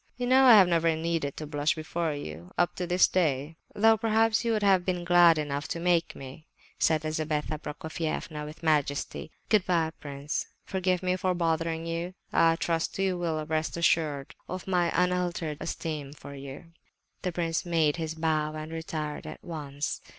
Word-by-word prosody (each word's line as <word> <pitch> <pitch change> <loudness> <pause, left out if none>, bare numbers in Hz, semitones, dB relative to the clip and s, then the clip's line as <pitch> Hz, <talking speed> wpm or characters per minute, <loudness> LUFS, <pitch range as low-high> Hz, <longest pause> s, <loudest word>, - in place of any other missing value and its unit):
"You 250 - -2
know 260 +2 +5
I 250 - +9
have 195 -4 +7
never 165 -1 +2
needed 160 -3 -2
to 155 - -5
blush 145 0 0
before 160 0 -2
you, 85 - -8
up 175 - +2
to 180 - -2
this 180 +1 +5
day, 155 -3 0 0.2
though 225 +1 +5
perhaps 225 0 +2
you 230 - +1
would 215 -2 0
have 190 -3 +4
been 180 -1 -1
glad 175 -2 +6
enough 145 -1 -2
to 170 - -3
make 170 -1 +1
me," 135 +4 -10 0.3
said 155 -1 +2
Lizabetha 155 -1 -2
Prokofievna,—with 155 0 -5
majesty. 150 -2 0 0.2
"Good 215 -4 +4
bye, 165 -3 +2
prince; 140 +1 -4 0.2
forgive 185 -1 0
me 185 0 +1
for 185 0 0
bothering 165 -1 0
you. 170 +2 -4 0.2
I 165 0 +5
trust 165 0 -1
you 195 -1 +1
will 160 -3 -2
rest 155 +1 -2
assured 155 -4 +1 0.2
of 185 0 -5
my 175 -2 +2
unalterable 180 -4 0
esteem 150 -4 -4
for 140 - -11
you." 140 +4 -9 0.5
The 180 - -1
prince 165 -1 -1
made 165 -3 +1
his 160 -1 -3
bows 155 -1 0
and 155 +1 -6
retired 155 -2 -4
at - - -9
once. 145 -4 -4
165 Hz, 170 wpm, -28 LUFS, 155-180 Hz, 0.5 s, I